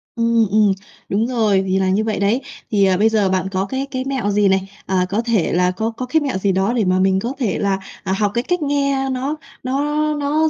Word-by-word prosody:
Ừm, 230 -1 +2
ừm, 210 0 +4 0.4
đúng 215 +4 +1
rồi, 215 -6 +2
thì 190 +1 +1
là 190 -1 +1
như 200 +3 +2
vậy 220 -1 -2
đấy. 205 +6 +1 0.3
Thì, 200 -2 +4
ờ, 190 -1 +3
bây 215 +3 +4
giờ 210 -3 +2
bạn 185 0 0
có 190 0 0
cái 265 +6 -3
cái 260 -1 -2
mẹo 265 -7 -1
gì 205 0 +3
này, 190 0 +1 0.2
à, 185 -1 +1
có 205 +4 0
thể 230 -7 0
là 180 +1 +2
có 220 +5 -2
có 250 +3 -5
cái 315 +5 +1
mẹo 275 -8 -1
gì 195 +1 +1
đó 190 +4 +1
để 230 -4 +1
mà 185 0 +2
mình 190 0 +3
có 235 +6 -3
thể 220 -8 0
là, 195 -1 0 0.2
à, 190 -2 -1
học 205 +1 +1
cái 235 +1 0
cách 355 +4 -1
nghe 280 -2 0
nó 265 +3 -2 0.3
nó 265 +3 -1 0.3
nó 295 +2 +1
215 Hz, 250 wpm, -19 LUFS, 190-255 Hz, 0.4 s, ừm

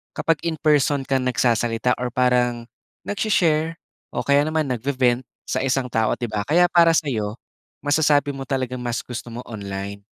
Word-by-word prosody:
kapag 165 -2 +1
in 165 - -1
person 145 -2 +3
ka 135 0 0
nagsasalita 120 -1 +1
or 125 - -1
parang, 125 -1 +1 0.4
nagsi-share 165 -6 +1 0.4
o 120 - -1
kaya 140 +2 +4
naman 155 0 +1
nagbe-vent 125 0 0 0.2
sa 130 - -1
isang 130 0 0
tao 110 -2 +1
'di 120 - -3
ba, 105 -1 -1
kaya 175 +3 +5
para 170 -1 +6
sa'yo 110 -9 -1 0.5
masasabi 145 -1 +3
mo 135 - -7
talagang 130 -2 -2
mas 120 -1 -3
gusto 120 -1 -6
mo 120 +2 -8
online. 100 -2 -6
130 Hz, 160 wpm, -22 LUFS, 120-145 Hz, 0.5 s, para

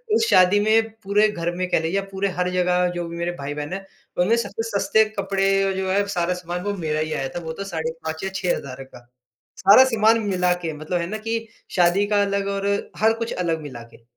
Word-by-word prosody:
उस 445 -1 +2
शादी 185 +3 +5
में 220 +2 +3
पूरे 205 +2 +3
घर 175 -4 -2
में 185 0 -2
कह - - +2
लीजिए, 165 +3 -2
या - - -2
पूरे 195 +1 -1
हर 180 - +1
जगह 180 0 +2
जो 175 -1 -3
भी 170 - -7
मेरे 170 +1 -1
भाई-बहन 145 +3 -5
हैं, 195 0 -5 0.3
उनमें 190 +6 +3
सबसे 225 +1 -3
सस्ते 205 +2 +3
कपड़े 195 0 +1
और 195 - 0
जो 190 0 -2
है 200 +1 +2
सारा 180 -2 0
सामान, 180 0 -5
वो 205 0 -1
मेरा 155 -3 -2
ही 155 0 -2
आया 135 -1 -2
था। - - -2
वो 160 0 -5
तो 195 - -6
साढ़े 160 -4 -3
5 160 +1 -4
या 190 - -1
6 180 -2 0
हज़ार 135 -1 -8
का, 120 -2 -16 0.5
सारा 205 +7 +7
सामान 225 -2 +3
मिलाके, 180 -3 0
मतलब 155 +4 -3
है 170 - -3
ना 215 +4 -4
कि 225 0 -2 0.3
शादी 180 +3 +3
का 205 -1 +2
अलग 200 0 0
और 195 0 -2 0.3
हर 220 +1 +5
कुछ 230 - -3
अलग 165 -3 -1
मिलाके। 120 -5 -11
185 Hz, 230 wpm, -23 LUFS, 170-200 Hz, 0.5 s, सारा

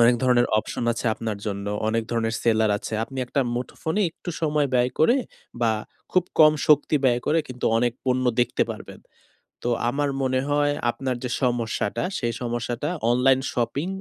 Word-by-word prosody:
অনেক 120 +1 +6
ধরনের 125 -1 +4
অপশন 115 - -3
আছে 115 +1 -4
আপনার 110 -2 -4
জন্য, 100 -1 -3 0.2
অনেক 115 +1 +1
ধরনের 115 -1 0
সেলার 110 -2 +3
আছে। - - -7
আপনি 135 +2 -9
একটা 140 - 0
মুঠোফোনে 160 +9 -3
একটু 175 - -8
সময় 150 -2 +1
ব্যয় 125 0 +3
করে, 200 - +5 0.4
বা 115 -2 +3 0.4
খুব 185 -1 +3 0.2
কম 155 -1 +8 0.2
শক্তি 150 +1 +4
ব্যয় 120 -2 +3
করে, 160 - +3
কিন্তু 125 -1 -6
অনেক 120 0 +1
পণ্য 130 0 +1 0.2
দেখতে 120 - +1
পারবেন। - - -9 0.6
তো 120 - 0 0.2
আমার 145 +3 0
মনে 130 -1 +1
হয়, 145 0 +2 0.2
আপনার 130 +1 -3
যে, 125 - -2
সমস্যাটা, 115 -2 0 0.2
সেই 120 0 -1
সমস্যাটা 120 +3 -2 0.2
অনলাইন 130 +2 +4
শপিং 135 +7 -1
125 Hz, 165 wpm, -24 LUFS, 115-145 Hz, 0.6 s, কম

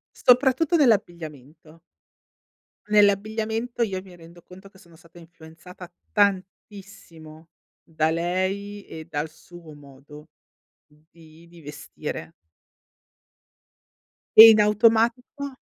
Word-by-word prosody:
Soprattutto 265 +6 +2
nell'abbigliamento. 165 - -3 1.1
Nell'abbigliamento 215 +3 0
io 195 -5 -2
mi 185 -1 -17
rendo 170 0 -17
conto 190 +3 -16
che 195 -1 -21
sono 170 -3 -21
stata 170 +1 -21
influenzata 170 +2 -15 0.2
tantissimo, 190 -5 -5 0.3
da 155 -1 -2
lei 185 +4 -4
e 160 -1 -11
dal 150 +1 -4
suo 170 0 -16
modo 145 +1 -16 0.6
di 160 +2 -22
di 170 0 -18
vestire. 150 +2 -9 2.0
E 225 +1 +11
in 215 - +2
automatico 230 +6 0
180 Hz, 90 wpm, -23 LUFS, 160-210 Hz, 2.0 s, E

